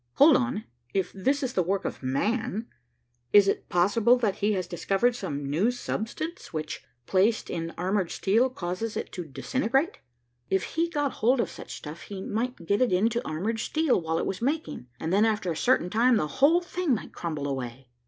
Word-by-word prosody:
Hold 295 0 +7
on 250 -4 0 0.3
if 190 -2 0
this 270 +9 0
is 260 - -2
the 185 - +2
work 190 +3 -1
of - - -4
man, 210 - -1 0.7
is 205 -1 +8
it - - -1
possible 210 +7 +4
that 215 -5 0
he 210 +1 +1
has 185 -2 -1
discovered 195 +8 +1
some 145 - -4
new 165 +11 +2
substance 245 +7 -4
which, 155 -3 -4 0.2
placed 200 - +2
in 165 -1 -3
armored 185 0 0
steel, 225 +7 +2
causes 210 0 -4
it - - -4
to 180 - -5
disintegrate? 265 - -1 0.5
If 190 - +2
he 335 +1 -1
got 290 -4 0
hold 245 +4 +2
of - - 0
such - - -8
stuff, 150 +2 -8
he 200 -2 -7
might 230 -4 -3
get 200 +5 +1
it 250 - +3
into 220 +6 +2
armored 205 +9 -2
steel, 310 - +1
while 160 0 -1
it - - -1
was 190 - -3
making, 280 - -2
and 160 +2 -2
then 205 +2 +5
after 210 -5 +1
a - - -2
certain 180 -3 +2
time 240 +2 +4
the 155 - +1
whole 285 - +4
thing 350 -5 0
might - - -7
crumble 155 -4 -3
away." 130 -1 -5
210 Hz, 195 wpm, -27 LUFS, 175-250 Hz, 0.7 s, is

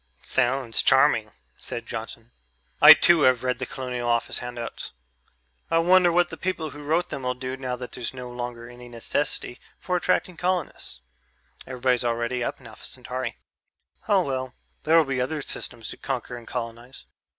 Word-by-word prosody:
"Sounds 125 -2 +1
charming," - - +4 0.3
said 120 - -6
Johnson. 115 +1 -7 0.5
"I - - +12
too 170 -2 +5
have 130 -3 +4
read 125 -1 -1
the 130 - -3
Colonial 125 -2 -4
Office 120 -1 +1
handouts.... 120 -1 -6 0.8
I 165 - +3
wonder 175 +1 +5
what 175 +1 +3
the - - -6
people 165 -5 -3
who 145 - -10
wrote 160 +4 0
them'll 125 -1 -2
do 130 +1 -5
now 130 -1 -3
that 125 0 -8
there's 120 - -5
no 125 -1 -8
longer 120 -1 -6
any 125 0 -12
necessity 120 +2 -1 0.2
for 180 - -2
attracting 180 0 0
colonists 175 - -2 0.7
everybody's 125 -1 +1
already 120 +1 -1
up - - -3
in 130 - -18
Alpha 110 -2 -11
Centauri. 125 -1 -5 0.7
Oh, 200 -3 +4
well; 130 -3 -3 0.3
there'll 160 0 +5
be 135 -2 -1
other 150 +5 -2
systems 115 -4 -5
to - - -7
conquer 125 -2 -4
and 120 -1 -11
colonize." 120 +1 -6
125 Hz, 160 wpm, -25 LUFS, 120-145 Hz, 0.8 s, I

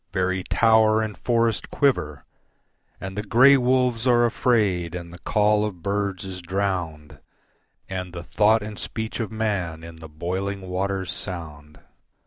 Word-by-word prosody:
Very 95 0 0
tower 110 -1 +4
and 105 -2 -4
forest 115 -2 0
quiver 80 - 0 0.7
And 95 0 -7
the 105 - -2
grey 125 +6 +6
wolves 125 -2 +1
are 120 -1 +5
afraid 100 -8 +1
and 85 -1 -7
the 90 - -11
call 105 +4 +2
of 95 -6 -5
birds 100 -1 -2
is 95 -1 -7
drowned, 90 -5 -3 0.7
And 90 -1 -5
the 85 -1 -7
thought 110 +4 +3
and 105 0 -7
speech 110 0 -5
of 115 -2 -3
man 100 -8 -2
in 85 0 -10
the 80 -1 -11
boiling 95 +5 -3
water's 95 0 -2
sound. 75 -5 -7
100 Hz, 145 wpm, -24 LUFS, 90-110 Hz, 0.7 s, grey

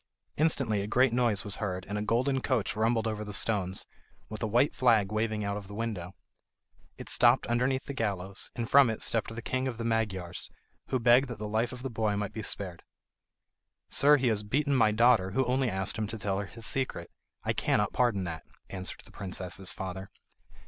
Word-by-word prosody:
Instantly 135 -9 +1
a 100 - -4
great 125 +2 +3
noise 120 -5 +2
was 105 - +2
heard 95 -3 -3
and 100 - -4
a 105 - -1
golden 125 +5 +1
coach 120 -8 0
rumbled 115 +1 +1
over 110 -1 -2
the 105 - -7
stones, 95 -1 +1 0.4
with 110 - -7
a 110 - 0
white 120 +7 +2
flag 110 -6 +3
waving 110 0 -1
out 100 0 -2
of 100 -2 -8
the 100 - -9
window. 105 -5 -4 0.8
It - - -9
stopped 120 +2 +4
underneath 125 +3 0
the 140 - -5
gallows, 100 -6 -1
and 115 -1 -3
from 140 -1 +6
it 110 - -3
stepped 115 0 0
the 115 - -6
king 130 +2 -1
of 125 -3 -4
the 115 - -4
Magyars, 105 -7 -2 0.4
who 130 - 0
begged 120 +3 +5
that 120 -3 -6
the 105 0 -5
life 110 +3 0
of 125 0 -9
the 135 - -4
boy 110 -2 0
might 105 0 -3
be 110 - -5
spared. 95 -4 -2 1.1
"Sir, 145 +2 +5
he 130 -3 +1
has 105 -2 +1
beaten 140 +7 0
my 110 -4 +4
daughter, 110 -4 +4
who 130 +3 +2
only 130 +1 +1
asked 95 +2 -1
him 110 - -1
to 110 - -6
tell 100 -2 -1
her 100 - -4
his 115 +2 -9
secret. 130 +2 -2 0.3
I - - 0
cannot 105 0 +1
pardon 120 -6 +1
that," 85 -2 -5 0.3
answered 95 -1 -3
the - - -16
princess's 95 -1 -3
father. 95 +1 -6
110 Hz, 205 wpm, -29 LUFS, 100-120 Hz, 1.1 s, from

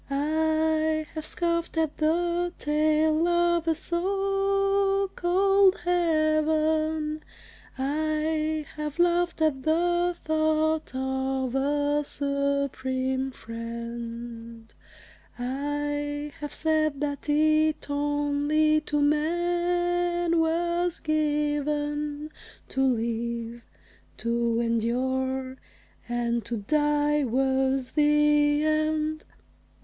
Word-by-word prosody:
I 315 +2 +1
have 310 -1 -5
scoffed 335 -1 -1
at 320 -2 0
the 345 +2 +1
tale 310 +2 +2
of 345 -1 +2
a 325 - +2
so 390 +2 0
called 390 +2 +3
heaven; 310 -2 +1 0.5
I 310 +2 -1
have 300 0 -4
laughed 345 -1 +2
at 285 -4 +1
the 345 +3 +1
thought 315 -1 +1
of 265 -1 -2
a 290 +2 +1
Supreme 275 -2 -1
Friend; 230 -1 -8 0.6
I 290 +3 -3
have 295 -1 -5
said 310 -3 0
that 285 0 -3
it 310 +1 +2
only 290 +1 +1
to 295 -1 -2
man 345 +2 +1
was 340 +2 0
given 295 -1 -1 0.4
To 265 - -1
live, 235 -1 -1 0.6
to 235 0 0
endure; 260 +3 -1 0.5
and 235 -1 -1
to 235 +1 -3
die 295 +5 +1
was 265 +1 0
the 295 0 +3
end. 310 0 0
300 Hz, 80 wpm, -26 LUFS, 270-320 Hz, 0.6 s, called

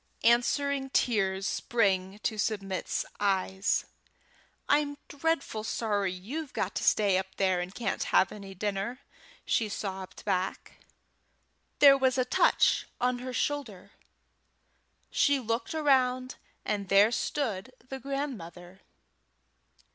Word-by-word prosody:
Answering 270 +3 +2
tears 195 -7 +1
sprang 195 -5 0
to 220 -2 -1
Submit's 195 -3 -2
eyes. 195 -1 +1 0.8
"I'm 290 0 +2
dreadful 285 -7 -1
sorry 205 -4 -1
you've 260 - -6
got - - -2
to - - -2
stay 200 -3 +3
up 190 0 -7
there, 185 -2 +2
and 180 +1 -4
can't 220 -5 -2
have 190 - +3
any 195 -2 -9
dinner," 205 +6 -3 0.4
she 220 -2 +1
sobbed 190 -2 -6
back. 190 -2 -2 1.0
There 275 -1 +7
was 260 -1 +2
a 255 - +2
touch 250 - +3
on 250 0 +1
her 255 +1 -5
shoulder. 250 -8 -3 1.2
She 285 -1 +3
looked 230 +5 -2
around 255 -4 +2 0.3
and 200 -2 -2
there 200 +3 +6
stood 235 -3 -2 0.2
the 270 - -5
grandmother. 190 - -6
220 Hz, 115 wpm, -29 LUFS, 195-265 Hz, 1.2 s, There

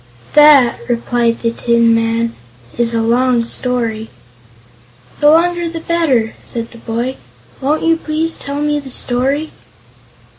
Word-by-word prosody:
"That," 295 -5 +6
replied 235 0 0
the 230 - 0
tin 235 0 +2
man, 230 0 0 0.4
"is 235 -1 0
a 225 - 0
long 240 +1 +2
story." 230 -2 -2 1.1
"The 295 - +5
longer 340 +2 +2
the 330 0 -6
better," 300 -10 0
said 230 -1 -4
the 230 - -13
boy. 235 +4 -4 0.4
"Won't 295 +4 0
you 330 0 +2
please 320 +1 -1
tell 280 +1 -5
me 295 0 0
the 275 -2 -10
story?" 265 +5 0
250 Hz, 135 wpm, -15 LUFS, 230-300 Hz, 1.1 s, That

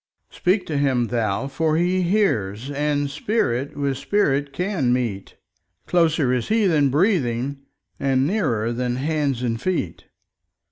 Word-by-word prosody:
Speak 185 +1 +1
to 150 -3 -2
Him 130 -4 +1
thou 115 0 -1
for 155 +3 0
He 180 +2 +1
hears, 135 - 0
and 145 0 0
Spirit 140 - -1
with 140 -2 -1
Spirit 145 -7 +1
can 165 -4 -1
meet—Closer 125 - -1
is 125 -2 -1
He 220 -1 +2
than 150 -6 +3
breathing, 140 - +1 0.4
and 135 -1 +2
nearer 120 - 0
than 125 0 -1
hands 140 -2 -1
and 115 -2 -2
feet. 130 - -2
140 Hz, 130 wpm, -22 LUFS, 120-165 Hz, 0.4 s, than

